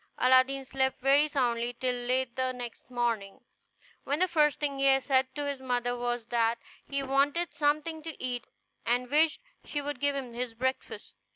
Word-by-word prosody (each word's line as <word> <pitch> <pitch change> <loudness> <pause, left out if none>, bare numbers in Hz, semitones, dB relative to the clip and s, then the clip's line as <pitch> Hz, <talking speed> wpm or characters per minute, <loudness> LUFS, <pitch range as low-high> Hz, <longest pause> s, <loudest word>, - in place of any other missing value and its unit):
Aladdin 260 +1 +4
slept 265 0 0
very 275 +3 +4
soundly 245 -4 0
till 255 -1 +1
late 245 0 -1
the 260 0 0
next 245 -1 -8
morning, 230 -5 -1 0.6
when 285 - 0
the 370 +3 +3
first 300 -4 +2
thing 280 -2 -2
he 270 0 +5
said 265 -1 +2
to 290 -1 -2
his 280 -1 -3
mother 245 -1 -1
was 240 -1 -2
that 230 0 +2 0.3
he 275 0 -1
wanted 285 +5 +1
something 305 +2 0
to 320 -1 -8
eat, 245 -2 -3 0.4
and 245 +2 0
wished 315 +8 +3 0.2
she 295 - -3
would 290 -2 -4
give 285 +1 +1
him 255 -4 -5
his 240 -1 -4
breakfast. 260 +3 -3
260 Hz, 175 wpm, -29 LUFS, 245-285 Hz, 0.6 s, he